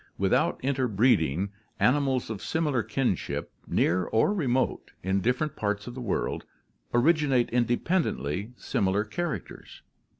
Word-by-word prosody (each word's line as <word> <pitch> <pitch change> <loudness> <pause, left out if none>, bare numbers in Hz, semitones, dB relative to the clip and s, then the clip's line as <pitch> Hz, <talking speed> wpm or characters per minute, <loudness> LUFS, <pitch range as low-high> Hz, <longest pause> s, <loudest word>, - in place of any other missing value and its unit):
Without - - +2
interbreeding, 105 - +2 0.3
animals 130 -3 +2
of 105 - -5
similar 150 -6 0
kinship, 125 -4 -2 0.2
near 90 +1 +2
or 115 - +2
remote, 130 -9 0
in 95 +1 +1
different 130 +7 0
parts 105 0 -2
of 120 - -7
the 130 - -7
world 115 -6 -2 0.5
originate 135 -1 +3
independently 120 - 0
similar 100 +1 0
characters. 160 +9 -5
120 Hz, 110 wpm, -27 LUFS, 100-140 Hz, 0.5 s, originate